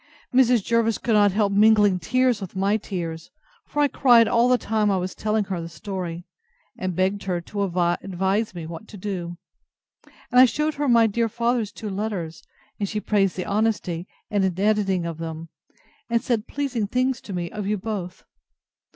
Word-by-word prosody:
Mrs. 250 -4 +4
Jervis 230 0 +1
could 235 - -1
not 205 -1 +5
help 200 0 +1
mingling 205 -2 +5
tears 245 +5 +1
with 190 -2 -7
my 195 +2 +2
tears; 170 -6 -5 0.4
for 295 - 0
I - - +5
cried 240 -5 +5
all 240 +1 +3
the 250 - +5
time 215 -3 0
I 195 - +2
was 185 0 -3
telling 215 0 0
her 190 -3 -4
the 165 - -7
story, 175 -2 -6 0.5
and 185 -2 -3
begged 190 +2 0
her 180 -2 -1
to 200 +4 -5
advise 190 +3 0
me 170 -2 -6
what 165 +6 -8
to 210 - -11
do; 180 -3 -5 0.9
and 250 - +7
I - - +10
shewed 300 +5 0
her 290 -1 -1
my 230 -1 +6
dear 225 +1 0
father's 235 -2 0
two 215 -2 -6
letters, 190 -6 -4 0.4
and 200 -2 -1
she 215 - -2
praised 200 -3 +1
the 180 - -3
honesty 200 -5 -1 0.2
and 205 -2 +2 0.2
editing 200 -4 +1
of 165 -1 -5
them, 165 0 -6 0.6
and 235 0 +2
said 235 -3 -1
pleasing 255 -7 -2
things 255 +2 0
to - - -10
me 175 -2 -3
of 210 -2 -4
you 210 +1 0
both. 185 -3 -5
205 Hz, 185 wpm, -24 LUFS, 180-225 Hz, 0.9 s, I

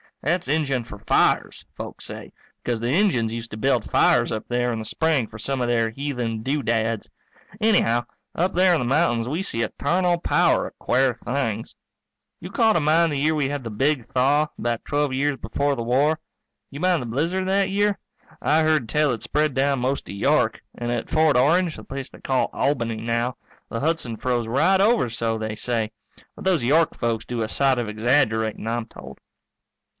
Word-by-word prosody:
That's 175 +5 0
Injun 140 -4 0
for 100 -3 -11
fires, - - +1
folks - - -7
say, - - -8 0.3
because 120 -2 -1
the 120 +2 -1
Injuns 135 - +2
used 115 0 -6
to 110 - -6
build 110 - +1
fires - - +3
up 110 - -4
there 120 0 0
in 115 - -2
the 110 - -6
spring 155 -1 +1
for 105 - -11
some 130 +4 -2
of 120 - 0
their 115 -2 +1
heathen 120 -4 -3
doodads. 115 -5 -1 0.5
Anyhow, 150 - +3 0.3
up 180 +3 0
there 185 +1 +4
in 165 - +2
the 125 - -1
mountains 120 -4 +1
we 155 +8 -2
see 115 -12 -2
a - - -2
tarnal 175 +3 0
power - - +2
of - - -14
quare 125 -2 +1
things. 120 -4 -2 0.6
You 180 - -8
call 220 0 +3
to - - +4
mind 160 +2 +3
the 145 - -1
year 155 +3 +2
we 145 -3 0
had 145 -2 -4
the 115 - -5
big 135 +2 0
thaw, 140 +4 +3
about 120 -1 -2
twelve 145 -1 0
years 140 +1 0
before 140 +1 -1
the 120 - -3
war? 140 +6 +2 0.5
You 140 - -8
mind 180 -2 +2
the 120 - -5
blizzard 165 +10 -1
that 195 0 +2
year? 205 0 +1 0.4
I 155 +2 +3
heard 155 -7 +1
tell 150 +1 +2
it 115 - -4
spread 150 -2 0
down 135 0 +2
most 130 +3 -1
to - - -8
York. 100 - +1 0.2
And 120 0 -3
at 120 -2 -3
Fort 155 -4 +3
Orange, 165 +6 +3
the - - -10
place 135 -1 -6
they - - -16
call 130 -1 0
Albany 120 -5 0
now, 115 +2 -1 0.3
the 115 - -3
Hudson 150 -6 -1
froze 120 -2 -1
right 185 +11 +3
over, 215 - +3
so 115 -1 -1
they 110 -1 -3
say. 115 -1 -2 0.4
But - - -10
those 180 -8 +2
York 155 +6 +3
folks 115 -2 -1
do 120 -2 -3
a 110 - -2
sight 135 -1 +2
of 120 - -2
exaggerating, 110 -1 +1
I'm 115 0 -1
told. 70 - -12
130 Hz, 200 wpm, -23 LUFS, 115-155 Hz, 0.6 s, there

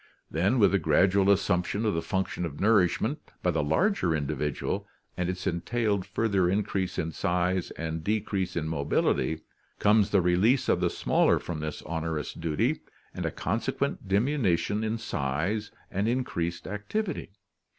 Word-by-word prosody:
Then 95 - +2
with 105 -4 +5
the 100 - +3
gradual 95 +5 +3
assumption 100 +2 +2
of 105 - +2
the 80 - 0
function 95 -1 -2
of 75 -4 -5
nourishment 100 -4 +3 0.2
by - - +3
the - - 0
larger 90 - +2
individual, 75 -1 -2 0.3
and 90 0 -1
its 90 +1 -4
entailed 100 +2 0
further 100 -4 +1
increase 95 -1 -1
in 80 - -1
size 90 +2 0
and 80 0 -3
decrease 100 -2 -1
in 80 -2 -1
mobility, 75 -2 0 0.4
comes 105 0 +4
the 100 - +4
release 100 +10 +3
of - - +3
the - - +3
smaller - - +2
from 85 -3 -5
this 75 0 -5
onerous 80 -1 -3
duty 105 - 0 0.3
and - - -3
a - - -2
con - - -1
sequent - - -2
diminution 105 - +1
in 110 +1 -1
size 95 - -2 0.2
and 100 +3 0
increased 85 -9 -2
activity. 175 - -3
95 Hz, 150 wpm, -28 LUFS, 85-105 Hz, 0.4 s, with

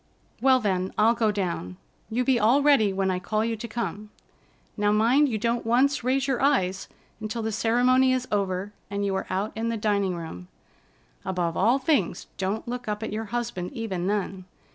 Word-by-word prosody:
"Well, 260 0 +5
then, 190 -4 -1
I'll 220 +2 +5
go 225 -2 +1
down. 170 - -3 0.3
You 245 +3 0
be 255 -2 +2
all 245 +7 +4
ready 275 -9 +4
when 190 0 0
I 180 - -1
call 215 +4 -1
you 230 0 -1
to 225 +2 -7
come. 215 -2 -4 0.7
Now, 205 -1 +1
mind 240 +7 +4
you 220 - -1
don't 235 +2 -1
once 260 +4 +2
raise 265 +2 +1
your 265 -3 0
eyes 195 -10 +1 0.3
until 220 +1 -4
the 220 - -1
ceremony 250 +4 +3
is 255 0 0
over 200 0 -1 0.2
and 200 0 -2
you 195 - 0
are 190 - -2
out 200 +3 -1
in 225 +1 -2
the 230 - -1
dining 200 -3 0
room. 160 - -8 0.8
Above 175 -3 -1
all 230 +7 +3
things, 265 - 0
don't 195 +4 -2
look 245 0 -5
up 210 +1 -3
at 220 - -4
your 220 +1 -3
husband 230 -6 -4
even 190 -6 -3
then. 195 -2 -2
215 Hz, 190 wpm, -26 LUFS, 195-240 Hz, 0.8 s, Well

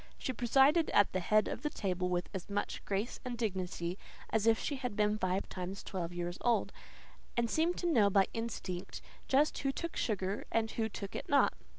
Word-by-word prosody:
She 260 - -3
presided 270 +7 +4
at 205 - +5
the 185 - +1
head 215 +4 +3
of - - -4
the 300 - 0
table 185 -7 -1
with 180 0 0
as 190 -1 -5
much 205 0 -2
grace 205 +4 -2
and 245 -1 -4
dignity 185 -4 -2 0.3
as 220 0 +2
if 225 -1 +6
she 285 - -2
had 250 -5 -4
been 210 0 +2
five 185 +1 0
times 185 +2 -5
twelve 175 -3 -4
years 175 0 -4
old, 240 -1 +2 0.7
and 235 -1 +3
seemed 325 +8 +1
to - - -3
know 230 -12 +4
by 195 0 +5
instinct 200 -5 -4 0.2
just 285 +3 +3
who 275 - 0
took 335 +4 -5
sugar 195 -2 -1
and 225 -1 +1
who 225 -1 -1
took 200 -1 -6
it - - -5
not. 285 - +5
210 Hz, 200 wpm, -33 LUFS, 185-245 Hz, 0.7 s, if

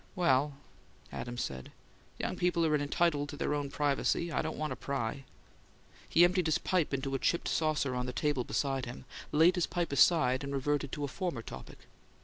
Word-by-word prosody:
"Well, 180 -2 -1
well," 140 0 +3 0.6
Adams 120 0 -4
said. 65 -1 -6 0.5
"Young - - -2
people 175 -2 +1
are 155 - +2
entitled 145 0 +1
to 145 - -7
their - - -1
own 145 -1 -2
privacy; 145 +4 0
I - - +1
don't 160 0 -4
want 155 0 -2
to - - -2
pry." 135 -1 -3 0.8
He 170 - +6
emptied 180 -1 +3
his 160 - +3
pipe 180 -5 0
into 135 0 -2
a 135 - 0
chipped 170 - 0
saucer 155 -4 0
on 125 0 -2
the - - -2
table 145 -2 0
beside 135 +1 -1
him, 125 +2 -8 0.3
laid 160 +4 +5
the 175 -2 0
pipe 175 -3 -2
aside, 140 -3 +4
and 140 0 -4
reverted 140 0 -1
to 145 - -3
a - - 0
former 155 - -3
topic. - - -10
145 Hz, 195 wpm, -31 LUFS, 135-165 Hz, 0.8 s, He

